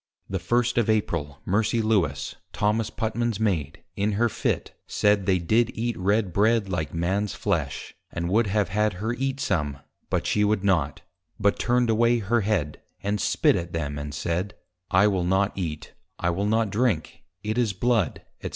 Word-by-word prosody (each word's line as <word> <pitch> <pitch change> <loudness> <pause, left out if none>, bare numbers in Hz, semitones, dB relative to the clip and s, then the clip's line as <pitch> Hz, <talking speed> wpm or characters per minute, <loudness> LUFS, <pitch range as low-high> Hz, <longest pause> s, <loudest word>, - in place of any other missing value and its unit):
The 95 - -2
first 120 +6 +1
of 115 - +1
April, 80 -10 -1
Mercy 110 +4 +1
Lewis, 95 -11 0 0.2
Thomas 105 +1 +1
Putman's 115 -1 -2
Maid, 85 -10 -1
in 105 +1 0
her 115 +3 +2
Fit, - - -1 0.2
said, 105 -2 +2
they 95 -2 +4
did 110 +7 +2
eat 120 +1 -1
Red 100 0 +1
Bread, 110 +1 +3
like 80 -6 -2
Man's 95 +5 -1
Flesh, - - -2 0.2
and 85 0 -3
would 105 +5 +2
have 100 -2 +1
had 105 +2 +1
her 110 +6 -2
eat 135 +2 -2
some, 75 - -1 0.3
but - - 0
she 105 - +2
would 105 -1 +1
not; 80 -8 +1 0.4
but 100 0 +2
turned 120 0 +2
away 115 +2 +3
her 115 +1 +1
head, 95 -8 -1 0.2
and 100 +1 0
spit - - +3
at 85 -1 -4
them, 75 -3 -2
and 75 0 -5
said, 90 +6 -2 0.4
_I 95 +1 +5
will 95 -4 +1
not 95 +3 +1
Eat, 80 -5 -5 0.2
I 85 - 0
will 100 +4 -1
not 110 -1 +1
Drink, 105 -7 0 0.2
it 110 +3 -1
is 115 -4 +2
Blood, 110 0 0 0.2
&c. - - -4
100 Hz, 180 wpm, -25 LUFS, 90-110 Hz, 0.4 s, I